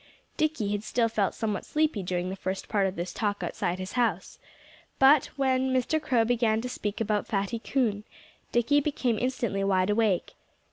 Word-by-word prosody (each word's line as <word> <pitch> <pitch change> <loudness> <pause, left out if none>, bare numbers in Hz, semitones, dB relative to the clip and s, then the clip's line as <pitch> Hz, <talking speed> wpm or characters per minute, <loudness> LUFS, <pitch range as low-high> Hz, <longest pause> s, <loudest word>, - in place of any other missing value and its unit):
Dickie 305 -10 0
had 205 0 -2
still 235 +1 +1
felt 210 -3 0
somewhat 210 -4 -2
sleepy 305 -8 0
during 180 0 -2
the - - -4
first 190 0 -4
part 200 -3 +1
of 190 - -4
this 175 +1 -4
talk 205 -3 -2
outside 175 +1 -2
his 185 +1 -6
house. 225 -8 -1 0.6
But 270 +1 +6
when 265 -1 +1
Mr. 260 +5 +1
Crow 245 -6 +2
began 230 -2 +2
to 250 - -4
speak 210 -4 -4
about 210 -2 0
Fatty 200 +2 -1
Coon, 225 -5 0 0.5
Dickie 240 +5 +3
became 255 -6 0
instantly 235 -6 -1
wide 190 0 +2
awake. 210 -4 +1
220 Hz, 175 wpm, -27 LUFS, 195-255 Hz, 0.6 s, But